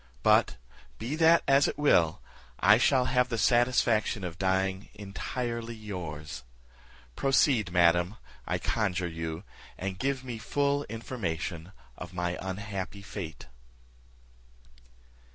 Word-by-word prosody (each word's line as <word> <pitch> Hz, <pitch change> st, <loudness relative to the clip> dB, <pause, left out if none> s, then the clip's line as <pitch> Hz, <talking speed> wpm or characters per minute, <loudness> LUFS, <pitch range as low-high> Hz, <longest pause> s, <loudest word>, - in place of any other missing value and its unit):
But, -, -, +4 dB, 0.4 s
be 120 Hz, +7 st, -3 dB
that 165 Hz, +1 st, +5 dB
as 140 Hz, +1 st, +5 dB
it -, -, -3 dB
will, 85 Hz, -, +3 dB, 0.4 s
I 105 Hz, +3 st, +6 dB
shall 130 Hz, 0 st, +3 dB
have 125 Hz, 0 st, +2 dB
the 115 Hz, -, -2 dB
satisfaction 120 Hz, -2 st, +2 dB
of 85 Hz, -1 st, -6 dB
dying 95 Hz, +1 st, 0 dB
entirely 115 Hz, +3 st, -4 dB
yours. 85 Hz, -8 st, -6 dB, 0.7 s
Proceed, 130 Hz, -, +2 dB
madam, 85 Hz, +2 st, +3 dB, 0.3 s
I -, -, 0 dB
conjure 95 Hz, -5 st, -1 dB
you, 80 Hz, +1 st, -5 dB, 0.3 s
and 95 Hz, -1 st, -4 dB
give 135 Hz, -1 st, -1 dB
me 120 Hz, -3 st, -6 dB
full 140 Hz, +4 st, 0 dB
information 95 Hz, -7 st, -4 dB, 0.3 s
of 90 Hz, 0 st, -8 dB
my 90 Hz, 0 st, -1 dB
unhappy 100 Hz, 0 st, -5 dB
fate." 95 Hz, -5 st, -7 dB
100 Hz, 115 wpm, -29 LUFS, 90-125 Hz, 0.7 s, I